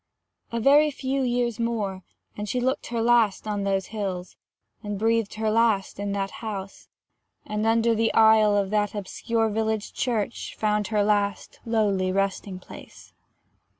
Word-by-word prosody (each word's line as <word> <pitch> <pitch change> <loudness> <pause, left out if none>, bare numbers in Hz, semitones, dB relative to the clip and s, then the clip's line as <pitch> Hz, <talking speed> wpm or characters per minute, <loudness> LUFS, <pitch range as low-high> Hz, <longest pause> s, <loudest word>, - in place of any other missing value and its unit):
A 235 - -1
very 290 +5 +5
few 270 -1 -2
years 240 -2 0
more, 215 -5 -2 0.3
and 210 0 -5
she 250 - 0
looked 260 +3 -1
her 230 -1 -2
last 230 -4 +3
on 205 -1 -2
those 195 -1 0
hills, 190 -4 -4 0.5
and 205 -2 -4
breathed 225 0 +1
her 220 0 0
last 220 -4 +1
in 205 0 -2
that 195 -1 -2
house, 200 -3 -6 0.6
and 210 +1 -2
under 230 +1 +3
the 225 0 +1
aisle 220 -2 +6
of 200 -1 0
that 210 0 0
obscure 225 +3 -1
village 220 0 -2
church 235 -3 -2
found 210 -1 0
her 210 -2 +1
last 205 -2 0
lowly 200 -5 +1
resting 195 0 -1
place. 185 - -13
215 Hz, 150 wpm, -25 LUFS, 200-230 Hz, 0.6 s, aisle